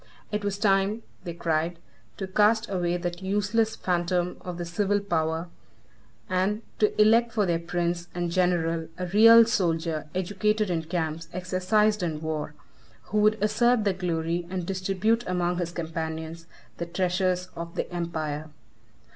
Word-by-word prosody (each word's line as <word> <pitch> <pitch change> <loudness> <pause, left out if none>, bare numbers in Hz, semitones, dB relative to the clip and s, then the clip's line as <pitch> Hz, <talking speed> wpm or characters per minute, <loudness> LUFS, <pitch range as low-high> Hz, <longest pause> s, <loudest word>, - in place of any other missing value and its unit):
It 210 0 -2
was 200 -1 -1
time, 200 +1 +2 0.2
they 170 - -4
cried, 165 0 -1 0.4
to 195 - -3
cast 215 +4 +3
away 175 -2 0
that 175 0 -4
useless 205 +3 +1
phantom 175 0 0
of 180 -1 -6
the 175 - -4
civil 200 +4 +1
power, 165 -3 -1 0.8
and 190 +4 0 0.2
to 210 0 +2
elect 230 +2 +5
for 210 -3 +2
their 170 -2 +1
prince 175 0 -2
and 175 -1 -2
general 170 -2 +1
a 180 - -3
real 225 +5 +8
soldier, 165 -7 0
educated 205 +2 0
in 165 -2 -1
camps, 165 -1 -3
exercised 185 +4 +1
in 160 -4 -2
war, 155 -1 -4 0.6
who 210 - +2
would 215 +1 +4
assert 225 +2 +3
the 200 -2 +2
glory, 170 -1 -2
and 185 -2 -3
distribute 195 +5 0
among 180 -1 0
his 170 -1 -2
companions 160 0 -5 0.3
the 170 - -4
treasures, 180 +1 0
of 170 0 -7
the - - -2
empire. 155 -3 -3
180 Hz, 145 wpm, -26 LUFS, 170-205 Hz, 0.8 s, real